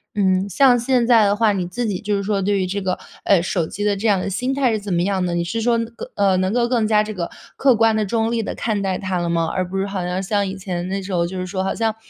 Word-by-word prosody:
嗯， 190 -1 +1
像 250 +5 +5
现 245 0 +2
在 230 -2 +5
的 200 0 +2
话， 220 0 +3
你 185 -3 -2
自 240 +7 -3
己 200 -5 -2
就 210 -1 -1
是 200 - -2
说 200 0 0
对 200 +1 +1
于 190 - 0
这 200 +2 -3
个， 185 -1 -1 0.3
呃， 190 -4 +4
手 175 -3 -1
机 205 - -5
的 205 -1 +2
这 205 +3 -2
样 200 -3 +3
的 185 - -3
心 250 +8 -1
态 270 -3 +2
是 220 - 0
怎 205 -1 -6
么 175 -1 +1
样 190 -1 0
的？ 175 -1 -1
你 170 - 0
是 225 +7 -3
说， 235 +1 +2
更 230 0 -5
呃， 200 -2 +3
能 185 +1 0
够 235 +1 +1
更 235 -3 +1
加 215 -1 +3
这 215 0 -5
个 175 -4 -4 0.3
客 270 -3 +4
观 225 0 +3
地、 215 - +1
中 225 +2 0
立 235 -1 0
地 - - -4
看 215 -3 -1
待 190 -2 -1
它 185 -2 -2
了 170 -1 -2
吗？ 165 -1 +1
而 185 -1 -1
不 195 - -3
是 195 - 0
好 195 -2 -3
像 180 +1 -2
像 200 +1 0
以 190 - -5
前 180 -2 -4
那 190 - -2
种 - - -7
时 190 - -5
候， 170 -1 +1
就 185 +2 -6
是 185 - -3
说 190 +1 -3
好 190 - -2
像， 225 -1 0
200 Hz, 340 characters per minute, -21 LUFS, 185-225 Hz, 0.3 s, 像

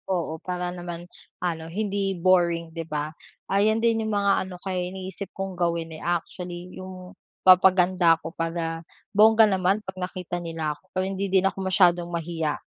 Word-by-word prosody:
Oo, 165 -4 -2
para 180 -1 -3
naman 175 -1 -7 0.4
ano 165 -2 -2
hindi 195 0 -1
boring, 170 -2 +2
'di 165 0 -4
ba? 150 0 -3 0.4
Ayon 210 +3 +3
din 230 -1 +3
yung 220 - -2
mga 200 0 +3 0.2
ano 185 - -8
ko, 180 - -11
eh, 180 -1 -2
iniisip 190 0 -7
kong 195 0 -4
gawin, 170 -2 -1
eh, 155 - -9
actually 175 +1 -4
yung 185 -1 -9 0.3
papaganda 185 -2 +6
ako 165 0 -8
para 165 -1 -3 0.3
bongga 220 +2 +7
naman 190 +2 +2
'pag 190 0 -7
nakita 180 -1 -4
nila 165 -3 -3
ako, 185 +5 -24
para 185 0 0
hindi 195 +1 -2
din 190 0 +3
ako 195 - 0
masyadong 175 -2 +3
mahiya 165 -2 -2
180 Hz, 170 wpm, -25 LUFS, 170-190 Hz, 0.4 s, bongga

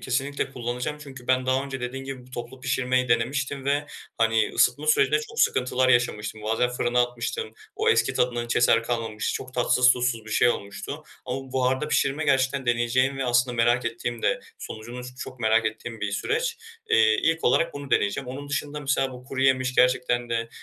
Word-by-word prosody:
kesinlikle 135 +2 -2
kullanacağım 125 +4 -4
çünkü 135 -4 -11
ben 130 0 +2
daha 130 +1 +1
önce 135 -2 -6
dediğin 130 +2 -5
gibi, 130 -2 -7
bu 130 - -19
toplu 125 +1 -7
pişirmeyi 130 0 0
denemiştim 135 +4 0
ve, 145 +1 0 0.3
hani, 115 0 +2
ısıtma 145 +5 +2
sürecinde 150 0 +4
çok - - -5
sıkıntılar 130 0 +2
yaşamıştım. 110 -3 +1
Bazen 115 +3 +1
fırına 125 0 +1
atmıştım, 120 - -4 0.2
o 440 +2 +1
eski 450 - +3
tadından 120 -1 0
hiç 120 - -2
eser 115 -1 +4
kalmamıştı, 115 -2 -2
çok 130 0 -6
tatsız 125 0 +4
tuzsuz 120 -3 -1
bir 110 - -10
şey 120 - +4
olmuştu. 100 -3 -4 0.2
Ama 130 +1 -5
buharda 130 +3 +1
pişirme 150 +1 +1
gerçekten 135 -1 +1
deneyeceğim 125 +3 +1
ve 135 - -1
aslında 120 0 +2
merak 120 +1 +3
ettiğim 115 0 -4
de - - +1 0.2
sonucunu 120 +3 -8
ç - - -7
çok 130 -1 -8
merak 110 0 +3
ettiğim 110 +1 -6
bir 105 -1 -2
süreç. 465 - -1 0.3
Eee, 110 -1 +5
ilk 165 0 +1
olarak 165 +7 +2
bunu 140 -1 -7
deneyeceğim. 115 +6 +1
Onun 140 +3 -7
dışında 145 +1 -3
mesela 135 -1 0
bu 125 0 -11
kuruyemiş 130 -1 +1
gerçekten 125 -1 +2
de, 115 0 -1
125 Hz, 185 wpm, -25 LUFS, 120-135 Hz, 0.3 s, Eee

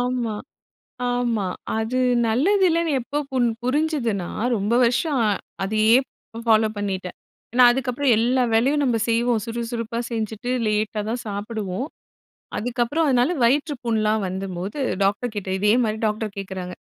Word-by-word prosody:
ஆமா, 245 -3 -1 0.8
ஆமா. 240 -4 0 0.3
அது 220 +3 -1 0.3
நல்லது 360 - +2
இல்லன்னு 335 -1 +1
எப்போ 285 +5 -4
புரு 250 -2 +2 0.2
புரிஞ்சதுனா 255 - 0 0.3
ரொம்ப 210 +2 0
வருஷம், 250 +5 +1
அ - - +3 0.3
அதையே 215 +3 +3 0.5
பாலோ 220 -1 +5
பண்ணிட்டேன். 190 -3 -3 0.4
ஏன்னா, 250 0 +6
அதுக்கப்புறம் 265 +1 0
எல்லா 250 +3 +2
வேலையும் 275 +6 +3
நம்ப 245 -4 +2
செய்வோம் 230 0 +2
சுறுசுறுப்பா 230 0 -4
செஞ்சிட்டு 225 +1 -3 0.2
லேட்டாதான் 215 +2 -1
சாப்புடுவோம். 205 +2 -4 0.7
அதுக்கப்புறம் 245 +7 0
அதனால 255 +4 +3
வயிற்றுப்புண்லாம் 235 -6 +1
வந்தம் 185 0 -4
போது 195 +10 -5 0.3
டாக்டர் 215 +4 0
கிட்ட 200 -2 -4
இதே 210 +2 +3
மாதிரி 215 0 -1
டாக்டர் 210 -1 -2
கேக்குறாங்க. 185 -2 -5
230 Hz, 125 wpm, -23 LUFS, 210-250 Hz, 0.8 s, ஏன்னா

